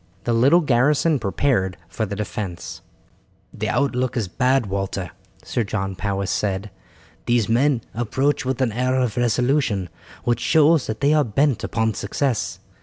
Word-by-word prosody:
The 120 - 0
little 135 +10 +5
garrison 145 +3 +2
prepared 100 -3 0
for 110 +4 -3
the 100 - -4
defence. 100 -4 -5 0.7
"The - - -3
outlook 130 0 0
is 110 -5 -1
bad, 125 +6 +1
Walter," 95 -3 -3 0.3
Sir 120 - -1
John 95 -2 -3
Powis 100 0 -2
said. 100 0 -2 0.6
"These 120 -4 +2
men 125 +2 +2
approach 130 +5 0
with 130 0 -1
an 120 - 0
air 125 +3 0
of 125 -4 0
resolution 120 - +1 0.3
which 120 -1 +1
shows 155 +2 +4
that 110 +2 -4
they 145 +2 +4
are 155 -1 +4
bent 135 +2 +1
upon 110 -1 0
success. 120 +4 -2
120 Hz, 150 wpm, -22 LUFS, 100-135 Hz, 0.7 s, little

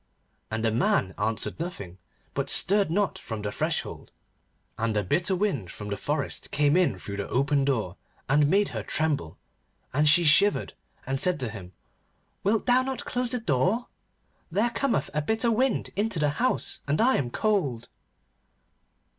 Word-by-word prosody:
And 110 +1 -2
the 110 - +2
man 100 -4 +1
answered 110 +6 -1
nothing, 130 - -6 0.3
but - - -2
stirred 200 -1 +2
not 200 +4 0
from 110 -3 -6
the 105 - -2
threshold. - - -3 0.7
And 110 -1 0
a 105 - +1
bitter 175 - +1
wind 175 - -1
from 105 0 -7
the 100 - -1
forest 145 +7 -3
came 145 +1 +2
in 180 - +2
through 100 +2 -6
the 100 - -4
open 140 +2 +2
door, 110 -10 -1 0.3
and 145 +2 +3
made 200 +3 +3
her - - -4
tremble, 150 - -1 0.6
and 150 +3 +4
she 170 +3 +6
shivered, 185 +6 +4 0.3
and 135 +1 -2
said 180 0 +2
to 125 - -2
him: 95 -5 -9 0.7
'Wilt 210 +2 +1
thou 250 0 +5
not 265 0 -4
close 250 0 -1
the 250 0 +1
door? 190 - 0 0.6
There 215 +7 +1
cometh 235 - 0
a 150 - 0
bitter 220 +8 +1
wind 255 +4 +1
into 205 -1 -1
the 150 -1 +2
house, 245 - -1
and 145 +2 +1
I 255 +3 +4
am 125 - -1
cold. 150 - 0
150 Hz, 165 wpm, -27 LUFS, -, 0.7 s, she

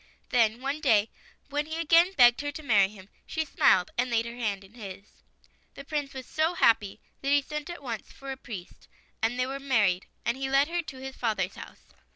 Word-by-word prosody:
Then, 230 -1 +2
one 280 +3 -2
day, 220 -7 +3 0.4
when 295 +1 -1
he 315 +1 -4
again 335 +3 +5
begged 245 -5 +6
her 290 0 -3
to 310 - -8
marry 205 -7 +4
him, 195 -2 -14 0.2
she 315 0 -2
smiled 185 -9 +3
and 250 +1 +1
laid 230 -1 +1
her 235 - -6
hand 210 -5 -2
in 195 +2 -17
his. 200 -4 -11 0.5
The 275 - -8
Prince 290 -2 -3
was 260 -1 -6
so 320 +3 0
happy 210 - +3 0.2
that 275 - -2
he 285 0 +5
sent 300 +3 -5
at 345 -4 -8
once 230 -4 -5
for 275 0 -8
a - - -3
priest, 210 -9 -10 0.3
and 230 +2 +1
they 250 - +2
were 270 +1 -4
married, 210 -10 +2 0.2
and 235 +2 0
he 270 0 -2
led 275 +3 +3
her 345 0 0
to 280 -5 -10
his 265 0 -7
father's 205 -5 -1
house. - - -13
260 Hz, 215 wpm, -28 LUFS, 220-290 Hz, 0.5 s, begged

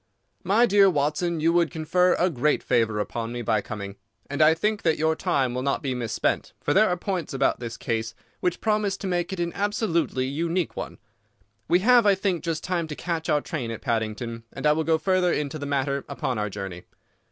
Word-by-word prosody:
"My 225 +5 +4
dear 200 -3 +5
Watson, 155 +2 0
you 165 +2 +3
would 170 -2 +3
confer 180 +2 +2
a 180 +1 +1
great 150 +2 +1
favour 115 -3 +1
upon 115 +2 -3
me 120 0 -4
by 110 -1 +1
coming. 100 -1 -7 0.3
And 145 - -1
I 155 +1 +6
think 210 +5 0
that 160 -2 +2
your 160 +1 +1
time 140 -9 0
will 125 - -2
not 140 +2 -1
be 135 -2 -1
misspent, 120 -3 -1
for - - 0
there 215 +1 +5
are 180 - 0
points 180 -6 -3
about 135 - +1
the 120 -1 -4
case 115 0 -2 0.2
which 180 -1 -1
promise 210 -2 +1
to - - -7
make 175 0 -1
it 190 - -4
an 170 0 -1
absolutely 200 - 0
unique 165 +6 -1
one. - - -6 0.7
We 175 +2 +3
have, 240 0 +5
I 200 - +6
think, 190 -3 -1
just 165 -2 -2
time 175 -3 -1
to 150 - -6
catch 170 0 -3
our 150 -1 +3
train 135 -8 -4
at 115 - -6
Paddington, 115 -1 -2
and - - -6
I 150 - +6
will 160 +1 +1
go 160 0 +2
further 185 +1 +2
into 150 0 -2
the 145 - -4
matter 140 0 -1
upon 125 -4 -2
our 105 0 -1
journey. 95 -3 -7
160 Hz, 215 wpm, -25 LUFS, 125-180 Hz, 0.7 s, I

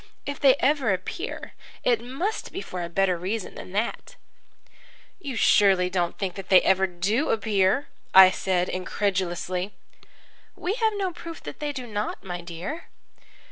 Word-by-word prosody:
If 285 -1 -4
they 270 -3 +6
ever 275 -5 +2
appear, 195 - -4 0.3
it 235 -2 +2
must 305 - -3
be - - -5
for 180 - -6
a 170 - -4
better 185 0 +1
reason 195 +3 -3
than - - -9
that." 210 +4 -2 1.0
"You 285 -7 -5
don't 230 - -3
surely 190 -3 +5
think 180 +1 -1
that 195 -1 -9
they 185 - +8
ever 190 0 +3
do 195 - 0
appear?" 215 +3 +2 0.2
I 190 0 +9
said 185 -1 0
incredulously. 185 0 -2 0.8
"We 370 - -2
have 445 -1 +1
no 385 -3 -2
proof 330 0 -9
that - - -8
they 295 -1 -2
do 260 -3 -6
not, 210 -2 -4
my 175 -2 -5
dear." 175 - -6
200 Hz, 155 wpm, -25 LUFS, 185-275 Hz, 1.0 s, I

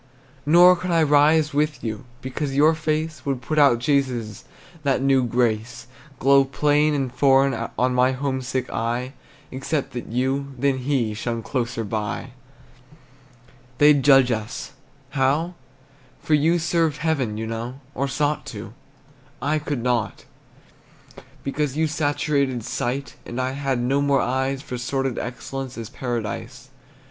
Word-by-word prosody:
Nor 175 +3 +7
could 180 +1 -5
I 165 -2 +3
rise 150 +1 +4
with 150 +1 0
you, 110 0 -4 0.2
Because 135 +1 -3
your 150 +3 +5
face 155 0 -2
Would 135 -3 -2
put 150 +5 -1
out 140 -5 +6
Jesus', 125 -5 -1 0.4
That 140 -2 +1
new 135 -1 +3
grace 120 0 -1 0.3
Glow 135 +2 +5
plain 150 +2 +2
and 135 -3 -2
foreign 135 -2 +3
On 125 0 +2
my 125 +1 +3
homesick 130 -1 -2
eye, 120 +3 -2 0.4
Except 135 +2 -2
that 120 - -5
you, 135 +3 -1
than 135 +1 +1
he 125 -4 0
Shone 115 +1 -3
closer 120 -3 -2
by. 110 +4 -4 1.5
They'd 145 0 +6
judge 135 -2 +6
us 110 0 -4 0.4
how? 145 +5 +1 0.7
For 155 - -1
you 160 +4 +4
served 165 -2 +1
Heaven, 145 -9 -1
you 110 - -3
know, 115 +4 -5
Or 140 +1 -1
sought 145 +3 -1
to; 110 0 -8 0.7
I 155 +2 0
could 145 -5 -3
not, 120 -3 -1 1.2
Because 145 0 -2
you 160 - +2
saturated 145 -4 0
sight, 125 +3 -3
And 120 - -6
I 130 0 0
had 135 -2 -1
no 135 +4 +1
more 140 -1 +3
eyes 130 +2 -1
For 125 - -6
sordid 135 0 -2
excellence 130 +1 -6
As 115 -1 -7
Paradise. 120 -5 -5
135 Hz, 140 wpm, -23 LUFS, 120-145 Hz, 1.5 s, Nor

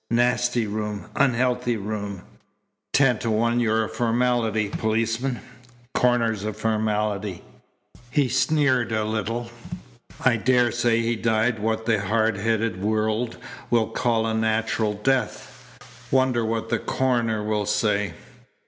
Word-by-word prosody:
"Nasty 120 0 +2
room! 105 0 -4
Unhealthy 125 -2 +1
room! 100 -2 -5 0.7
Ten 130 -5 +3
to 115 - -2
one 115 +2 +2
you're 110 -1 +2
a - - -3
formality, 115 -1 +1
policeman. 115 +4 -1 0.5
Coroner's 115 -4 +2
a 110 0 -2
formality." 105 -3 -1 0.7
He 140 0 +2
sneered 130 -1 +2
a 110 -1 0
little. 115 +2 -3 0.7
"I 125 -3 +4
daresay 120 -1 +2
he 115 +1 0
died 110 +1 +1
what 110 +1 -1
the 110 -3 +2
hard 110 +1 +1
headed 110 -2 -1
world 110 +2 0 0.3
will 115 -2 +2
call 115 0 0
a 110 - -1
natural 110 -1 0
death. 130 +5 -2 0.3
Wonder 130 -3 +2
what 115 0 -2
the 120 - +1
coroner'll 110 -5 0
say." 105 -4 0
115 Hz, 120 wpm, -24 LUFS, 110-120 Hz, 0.7 s, I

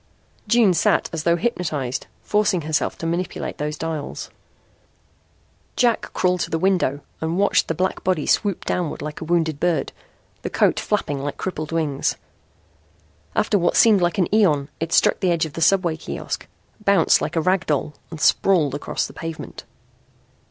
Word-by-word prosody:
June 230 -6 +4
sat - - +2
as 165 - -2
though 170 0 +4
hypnotised, 155 - -2 0.2
forcing 210 -4 +1
herself 155 0 -1
to - - -6
manipulate 175 +2 -3
those 150 +1 -3
dials. 160 -2 -5 1.4
Jack 240 -2 +1
crawled 180 0 +1
to - - -2
the 165 - 0
window 170 -6 +1 0.2
and 160 +2 -1
watched 200 +1 +3
the 165 - -1
black 185 +3 -1
body 180 -5 0
swoop 200 -4 +1
downward 175 -4 -2
like 150 +2 -6
a - - -4
wounded 160 -3 0
bird, 175 -1 0 0.5
the - - -4
coat - - +2
flapping 150 -9 -1
like 145 +1 -4
crippled 155 -4 -4
wings. 155 -4 0 1.2
After 205 - +2
what 175 0 +1
seemed 215 -5 +6
an 175 +2 +1
eon 155 -10 +3
it 165 0 -3
struck - - +3
the 185 - +1
edge 170 -2 +2
of 155 - -8
the 165 - -5
subway 175 -1 +3
kiosk, 160 - -5 0.4
bounced 200 -1 +4
like - - -3
a 165 - +2
rag 185 +2 +1
doll 150 0 0 0.2
and 160 - -8
sprawled 155 -3 +3
across 145 - -2
the - - -9
pavement. 165 -1 -7
165 Hz, 165 wpm, -22 LUFS, 155-185 Hz, 1.4 s, seemed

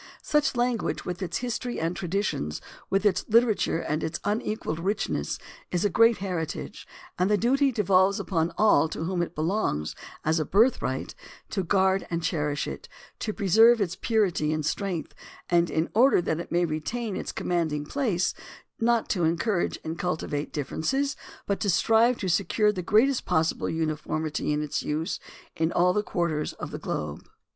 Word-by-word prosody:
Such 300 -3 +1
a - - -5
language, 240 -2 0
with 180 +1 -4
its 180 -1 -2
history 245 0 -3
and 165 +2 -1
traditions, 175 - -2 0.3
with 195 +2 +1
its 185 -3 +3
Hterature 220 -7 +2
and 155 +1 -1
its 160 +1 -3
unequalled 210 -5 -2
richness, 185 - -1 0.3
is 180 +2 0
a 205 - +2
great 230 +2 +5
heritage, 180 -4 -4 0.3
and 180 +2 +2
the 210 - +4
duty 270 +6 +3
devolves 195 -3 +3
upon 165 -2 0
all 185 -8 +4
to 160 - -4
whom 175 +1 -1
it 170 0 -3
belongs 155 - -1 0.3
as 160 +1 +2
a - - +1
birthright 220 - +1 0.4
to 195 - 0
guard 190 +1 +2
and 170 -1 -2
cherish 150 -2 -1
it, - - -7 0.3
to 215 - -2
preserve 225 +4 +5
its 185 -4 -1
purity 195 -9 +1
and 155 -1 -1
strength, 180 -1 -2 0.4
and 175 0 +4
in 160 +1 0
order 250 +2 +5
that 165 -2 -1
it 170 - -7
may 175 0 +2
retain 190 +8 -3
its - - -4
commanding 160 -4 -1
place 210 - 0 0.5
not 230 0 +2
to 180 -4 0
en 165 +1 +2
courage 195 -1 0
and 160 +1 -5
cultivate 155 -5 -2
differences, 265 - -1 0.3
but 200 - -1
strive 225 +5 +3
to 190 - -3
secure 200 +4 +2
the 185 -3 -4
greatest 230 +9 +3
possible 160 0 +1
uniformity 155 -1 -2
in 150 0 0
its 150 - -2
use 155 +2 -2 0.4
in 160 +1 0
all 180 +1 +3
quarters 170 -6 -1
of - - -7
the - - -5
globe. 75 -1 -4
180 Hz, 170 wpm, -27 LUFS, 160-215 Hz, 0.5 s, great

